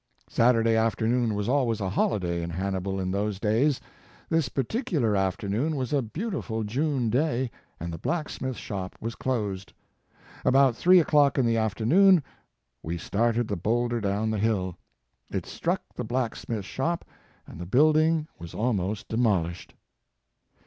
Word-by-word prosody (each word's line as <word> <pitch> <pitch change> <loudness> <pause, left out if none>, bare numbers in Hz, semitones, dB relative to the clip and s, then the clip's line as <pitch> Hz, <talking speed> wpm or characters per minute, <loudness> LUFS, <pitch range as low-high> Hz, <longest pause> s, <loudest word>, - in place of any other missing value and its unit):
Saturday 115 -1 +3
afternoon 115 0 +1
was 105 0 -2
always 125 -4 +1
a 95 -2 -2
holiday 90 -4 0
in 85 - -4
Hannibal 95 +2 -2
in 95 -1 -2
those 100 0 -1
days. 120 +7 +2 0.5
This 160 -3 +1
particular 140 - 0
afternoon 100 - 0
was 130 -1 -2
a 140 - +3
beautiful 125 - -3
June 125 +1 0
day, 130 -2 0 0.3
and 85 +1 -5
the 80 - -6
blacksmith 150 - -3
shop 95 -3 -5
was 115 +1 -4
closed. 105 -8 -3 0.7
About 135 -1 +4
three 180 +7 +6
o - - -2
clock 145 -2 +4
in 130 - +3
the 115 -1 +2
afternoon 145 - +4 0.6
we 85 +2 -4
started 115 +6 0
the 100 - -2
boulder 120 +5 0
down 105 +2 0
the 110 - -1
hill. 95 -5 0 0.5
It - - -3
struck - - -2
the - - -4
blacksmith 115 -3 -3
shop 165 - -2 0.4
and 80 - -10
the 85 - -6
building 155 - +3
was 85 -1 -9
almost 105 -3 -1
demolished. 95 -8 0
115 Hz, 145 wpm, -27 LUFS, 100-135 Hz, 0.7 s, three